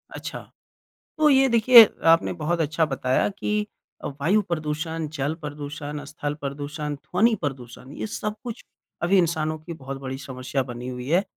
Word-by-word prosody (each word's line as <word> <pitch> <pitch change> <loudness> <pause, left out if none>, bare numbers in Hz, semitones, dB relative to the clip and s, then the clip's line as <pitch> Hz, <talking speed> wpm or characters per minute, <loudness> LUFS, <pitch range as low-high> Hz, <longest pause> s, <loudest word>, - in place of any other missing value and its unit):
अच्छा। - - -6 0.8
तो 305 -1 +5
ये 270 0 +5
देखिए, 235 0 +9 0.2
आपने 165 +2 +5
बहुत 170 0 -1
अच्छा 160 +1 +1
बताया 130 0 +1
कि 210 +1 -2 0.4
अ, - - -2
वायु 195 +9 +3
प्रदूषण, 160 -1 -3
जल 145 +1 -1
प्रदूषण, 145 0 -6
स्थल 145 0 -4
प्रदूषण, 145 +1 -4
ध्वनि 215 +10 +2
प्रदूषण 130 -2 -6
ये - - -3
सब 210 0 -3
कुछ 235 0 -6 0.4
अभी 190 +3 +4
इंसानों 155 -2 +1
की 155 +2 -8
बहुत 135 -2 -7
बड़ी 130 0 -5
समस्या 130 -1 -3
बनी 125 0 -7
हुई 125 0 -6
है। 175 +5 +4
155 Hz, 160 wpm, -24 LUFS, 140-175 Hz, 0.8 s, देखिए